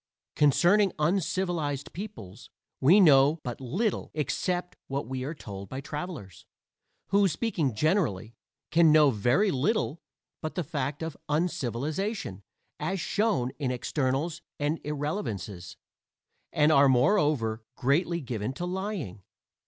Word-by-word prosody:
Concerning 175 +7 +4
uncivilized 165 -3 -1
peoples 180 - -9 0.3
we 170 +10 +6
know 145 -3 +6
but 125 0 -5
little 185 - -1
except 175 +4 -2
what 135 +1 -3
we 130 0 -4
are 150 +5 -4
told 100 -7 -8
by 130 - -5
travelers 150 - -7 0.6
who, 200 0 +4
speaking 160 - -1
generally, 125 - 0 0.4
can 165 -1 +6
know 150 -2 +6
very 125 - +2
little 165 - 0 0.4
but 155 - -4
the 180 - -1
fact 145 0 -3
of 160 -2 -4
uncivilization, 150 - -2 0.4
as 190 0 -2
shown 200 - 0
in 135 -4 -1
externals 135 +5 -1 0.2
and 150 +2 -1
irrelevances, 110 - -4 0.7
and 150 +1 +3
are 140 -2 +6
moreover, 130 - +2
greatly 170 +6 +1
given 120 -2 -3
to 175 - -4
lying. 180 - -4
150 Hz, 120 wpm, -28 LUFS, 130-180 Hz, 0.7 s, we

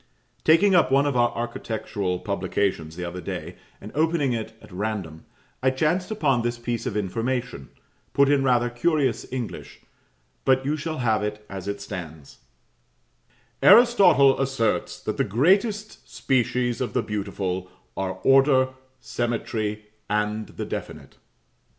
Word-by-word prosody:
Taking 190 +5 +5
up 180 -6 +4
one 140 +1 +4
of 140 -2 0
our 120 -1 +4
architectural 110 -5 -3
publications 95 -4 -2
the 90 0 -5
other 90 +1 -6
day, - - -6 0.2
and 105 - -10
opening 155 -4 +1
it 110 -1 -4
at - - -16
random, 95 -5 -4 0.4
I 130 - +3
chanced 155 +7 0
upon 145 - +1
this 120 0 -2
piece 120 +1 -3
of 110 -4 -2
information, 115 - -3 0.4
put 140 0 +4
in 140 -1 +3
rather 120 -2 +2
curious 130 -3 0
English; 125 -3 -6 0.6
but 130 0 +3
you 145 +2 +1
shall 155 +1 -4
have 110 -4 +1
it 105 0 -4
as 95 -1 -6
it 100 0 -4
stands 80 -7 -8 1.2
"Aristotle 195 - +6
asserts, 135 -5 -1
that - - -3
the - - +2
greatest 200 - +1
species 125 -1 0
of 125 - -2
the 125 - +1
beautiful 95 -3 -3 0.3
are 95 -1 -2
Order, 135 -1 +5 0.3
Symmetry, 110 -4 -3 0.2
and 105 +1 -1
the - - -6
Definite." - - -7
120 Hz, 140 wpm, -24 LUFS, 105-135 Hz, 1.2 s, Aristotle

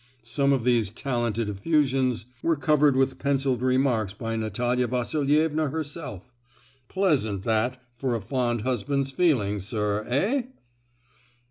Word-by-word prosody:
Some 140 +5 +1
of 135 -4 +1
these 120 -5 +2
talented 115 -1 -2
effusions 130 +2 +1 0.2
were 165 0 +2
covered 145 0 +3
with 130 0 +1
pencilled 135 -3 0
remarks 125 -5 +1
by 115 +1 -4
Natalia 120 +3 0
Vasilievna 150 +5 +1
herself! 140 - -6 0.5
Pleasant, 135 - +1
that, 115 +4 0 0.2
for 125 -1 -1
a - - -1
fond 120 +1 -1
husband's 135 +3 -1
feelings, 105 - +1
sir, 105 -2 -1
eh?" 200 - +1
125 Hz, 120 wpm, -26 LUFS, 115-140 Hz, 0.5 s, covered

